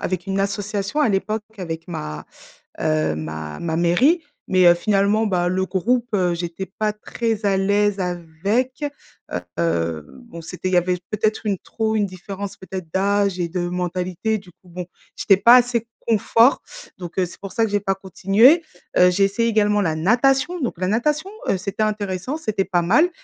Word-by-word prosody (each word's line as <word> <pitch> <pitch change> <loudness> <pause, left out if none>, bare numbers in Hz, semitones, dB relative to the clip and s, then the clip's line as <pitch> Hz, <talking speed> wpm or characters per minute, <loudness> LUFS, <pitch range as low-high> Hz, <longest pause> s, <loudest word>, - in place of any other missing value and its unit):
avec 180 -1 -3
une 195 0 -1
association 200 +4 -2
à 290 - +4
l'époque 210 +2 -1
avec 165 -2 -5
ma, 75 - -6 0.5
heu, 75 0 +1
ma 80 -1 -6
ma 160 -1 -3
mairie 250 - +3 0.3
mais 185 -1 +4
heu, 175 - +9
finalement, 205 +3 +2
bah, 180 -3 +1
le 190 +1 0
groupe, 235 +7 0
heu, 180 -3 +2
j'étais 170 +2 -4
pas 215 -1 0
très 220 0 -3
à 195 -1 +2
l'aise 205 +1 +2
avec. 185 - -2 0.8
Heu, 80 -2 -1 0.2
bon, 170 -8 -10
c'était 180 +3 -5
il - - -3
y - - +6
avait 180 +1 +1
peut-être 215 +1 0
une 200 -3 0
trop 220 -1 -2
une 205 -2 +2
différence 195 +2 -7
peut-être 190 -1 -7
d'âge 200 -1 +1
et 170 - 0
de 175 0 -2
mentalité 180 +4 -2
du 185 -2 -15
coup 180 - -24
bon, 180 0 -6 0.3
j'étais 195 - +4
pas 235 +6 +7
assez 240 -2 +2 0.2
confort 230 +3 +4 0.3
donc 175 0 -8
heu, 180 - +2
c'est - - -13
pour 195 - -8
ça 225 - +2
que - - -6
j'ai 205 0 +1
pas 195 -1 0
continué. 200 - +4 0.3
Heu, 180 0 +6
j'ai 195 +2 +2
essayé 230 +4 +1
également 210 -1 +2
la 160 -3 0
natation 270 - +2
donc 240 -9 -3
la 185 - -1
natation, 300 - 0 0.2
heu, 190 - +2
c'était 200 +3 -3
intéressant, 210 - -2
c'était 215 -10 -1
pas 180 -2 +1
mal, 305 - +4
195 Hz, 185 wpm, -21 LUFS, 180-220 Hz, 0.8 s, heu